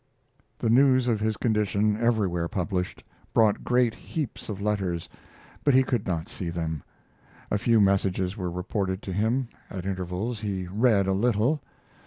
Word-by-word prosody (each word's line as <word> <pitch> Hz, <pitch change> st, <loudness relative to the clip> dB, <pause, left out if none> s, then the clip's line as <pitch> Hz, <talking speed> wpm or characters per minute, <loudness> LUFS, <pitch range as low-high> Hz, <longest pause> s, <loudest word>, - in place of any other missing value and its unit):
The 115 Hz, -, 0 dB
news 130 Hz, 0 st, +5 dB
of 115 Hz, -3 st, +2 dB
his 110 Hz, 0 st, 0 dB
condition, 105 Hz, -2 st, +1 dB
everywhere 105 Hz, -7 st, +1 dB
published, 90 Hz, 0 st, -3 dB, 0.3 s
brought 110 Hz, -2 st, +4 dB
great 125 Hz, -2 st, +2 dB
heaps 135 Hz, +2 st, -5 dB
of 100 Hz, -2 st, -4 dB
letters, 95 Hz, -5 st, -1 dB, 0.6 s
but 145 Hz, -3 st, +4 dB
he 130 Hz, -, +6 dB
could 120 Hz, -5 st, -1 dB
not 85 Hz, -1 st, -1 dB
see 100 Hz, -6 st, -4 dB
them. 80 Hz, -3 st, -3 dB, 0.7 s
A 105 Hz, -, +2 dB
few 115 Hz, 0 st, +3 dB
messages 95 Hz, -1 st, +2 dB
were 90 Hz, -5 st, -3 dB
reported 95 Hz, +2 st, -2 dB
to 95 Hz, -, -4 dB
him. 115 Hz, +6 st, 0 dB, 0.2 s
At 95 Hz, -1 st, -6 dB
intervals 95 Hz, +4 st, -3 dB
he 100 Hz, -3 st, -3 dB
read 100 Hz, +1 st, +3 dB
a 95 Hz, -, +1 dB
little. 120 Hz, +7 st, +2 dB
105 Hz, 155 wpm, -26 LUFS, 95-115 Hz, 0.7 s, he